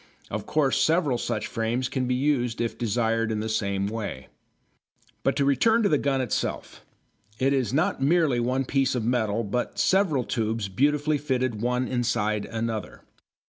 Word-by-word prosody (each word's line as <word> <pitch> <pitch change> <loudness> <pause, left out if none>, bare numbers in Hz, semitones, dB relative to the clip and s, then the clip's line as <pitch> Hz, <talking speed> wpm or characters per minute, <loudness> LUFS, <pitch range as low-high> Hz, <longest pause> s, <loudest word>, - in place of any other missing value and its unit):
Of 110 0 -4
course 145 -4 +2
several 155 -7 +2
such 105 -2 -2
frames 120 +2 -1
can 130 -1 -2
be 125 - +1
used 125 -4 0
if 115 -1 -1
desired 115 0 0
in 110 - -1
the 110 - -3
same 100 -3 -1
way. 100 - -5 0.9
But - - +1
to 140 - +1
return 220 - +3
to 200 - +3
the 150 - +3
gun 135 -2 +1
itself. 120 -5 -3 0.5
It 135 +3 +2
is 130 -6 0
not 155 +4 0
merely 150 -3 +3
one 130 +3 0
piece 135 +1 +1
of 120 -3 -1
metal 115 -2 0
but 120 +4 -3
several 185 -9 +2
tubes 110 -3 -2
beautifully 145 +7 +1
fitted 130 -6 -1
one 125 +1 0
inside 110 -4 0
another. 115 -2 -4
125 Hz, 165 wpm, -26 LUFS, 110-140 Hz, 0.9 s, return